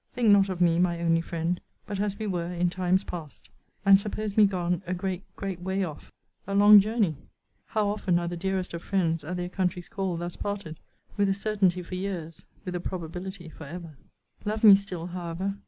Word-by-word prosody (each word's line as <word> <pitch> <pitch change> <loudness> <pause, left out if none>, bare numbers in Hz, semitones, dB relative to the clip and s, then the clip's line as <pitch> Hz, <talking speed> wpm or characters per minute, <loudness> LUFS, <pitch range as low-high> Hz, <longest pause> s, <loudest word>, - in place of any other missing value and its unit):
Think 240 -3 +3
not 200 -1 +6
of 180 -1 -3
me, 170 -1 +4
my 175 -1 +2
only 165 -1 +2
friend, 170 +1 -2 0.2
but 200 -2 -4
as 200 -1 -1
we 220 - -4
were 175 -3 -2
in 175 0 0
times 185 +1 +1
past: 150 - -8 0.4
and 195 0 +8
suppose 210 0 -4
me 215 -2 +7
gone 180 -2 -1
a 180 - -1
great, 185 0 -3
great 190 -3 -5
way 190 +2 -1
off! 155 -5 -7 0.4
A 195 - -2
long 205 +1 +9
journey! 205 - +1 0.5
How 215 -1 0
often 200 -4 +1
are 175 0 -1
the 175 - -3
dearest 185 +1 -2
of 170 - -4
friends, 165 -5 0
at 180 +4 -4
their 180 0 -2
country's 180 -1 -2
call, 190 -3 -2
thus 175 +1 -5
parted 200 -6 -5 0.4
with 200 -1 +3
a 195 - +2
certainty 195 -3 +1
for 175 - -10
years 180 -4 -5 0.2
with 180 - -4
a 180 - -2
probability 180 +1 -6
for 160 0 -10
ever. 165 +1 -8 0.5
Love 215 +1 -2
me 205 -3 +11
still, 190 -4 -4
however. 180 +3 -4
180 Hz, 205 wpm, -27 LUFS, 170-200 Hz, 0.5 s, me